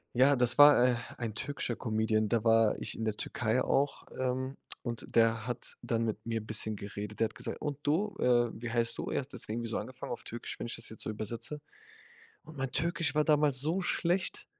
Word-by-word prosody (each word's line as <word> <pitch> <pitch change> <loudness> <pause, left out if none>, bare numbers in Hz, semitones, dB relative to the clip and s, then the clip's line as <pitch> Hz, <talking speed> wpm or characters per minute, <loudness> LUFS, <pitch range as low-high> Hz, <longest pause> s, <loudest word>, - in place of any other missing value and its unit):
Ja, 135 +3 +6
das 125 -1 +3
war, 145 -4 +9
äh, 125 - +2 0.2
ein 115 -3 -3
türkischer 125 0 -3
Comedian, 110 -1 0
da 115 -2 +1
war 115 -1 +4
ich - - -3
in 115 - -4
der 110 -1 -1
Türkei 120 +2 0
auch, 140 +1 0
ähm, 130 +1 -2 0.3
und 115 -2 -5
der 115 0 +3
hat 120 -1 -2
dann 115 -1 0
mit 110 - -3
mir 115 -1 -2
bisschen 110 0 0
geredet. 100 +1 -7
Der 115 - +4
hat - - -5
gesagt: - - -5
„Und 145 -2 -3
du, 175 +9 0
äh, 120 -2 +3
wie 120 +2 -6
heißt 115 0 +1
du?“ - - -3
Er - - 0
hat 135 - -13
das - - -5
irgendwie 115 +1 -3
so - - -1
angefangen 125 +4 -6
auf 120 - -5
Türkisch, 120 +1 -6
wenn - - -4
ich 115 - -4
das - - -4
jetzt 110 - -9
so - - -3
übersetze. 115 +7 -4 0.8
Und 155 0 -12
mein 135 -1 -2
Türkisch 170 -2 0
war 150 - +4
damals 150 -3 +3
so 160 +7 +1
schlecht 185 - 0
120 Hz, 220 wpm, -31 LUFS, 115-145 Hz, 0.8 s, war